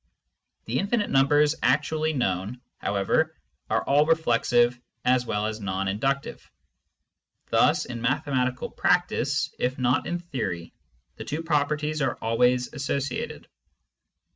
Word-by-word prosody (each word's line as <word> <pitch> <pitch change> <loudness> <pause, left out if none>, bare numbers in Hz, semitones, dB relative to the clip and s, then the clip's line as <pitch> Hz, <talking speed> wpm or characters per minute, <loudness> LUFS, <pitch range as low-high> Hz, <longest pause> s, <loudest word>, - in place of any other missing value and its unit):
The 120 +3 -1
infinite 205 +2 0
numbers 145 +2 +4
actually 155 +1 +1
known, 100 -2 -1 0.2
however, 105 +11 0 0.3
are - - +1
all 145 +2 +4
reflexive 120 -6 +2 0.2
as 125 -1 +3
well 105 0 -1
as 110 0 -3
non 95 -1 -2
induc 135 +8 0
tive; - - -10 1.0
thus, - - +3
in 120 -1 -6
mathematical 130 0 -1
practice, 160 -5 +1
if 130 +1 -1
not 125 +1 +1
in 175 - -1
theory, 130 - -5 0.4
the - - -6
two 155 +3 -4
properties 150 0 0
are 135 - 0
always 125 +2 +1
associated. 140 -2 -3
135 Hz, 120 wpm, -26 LUFS, 120-150 Hz, 1.0 s, numbers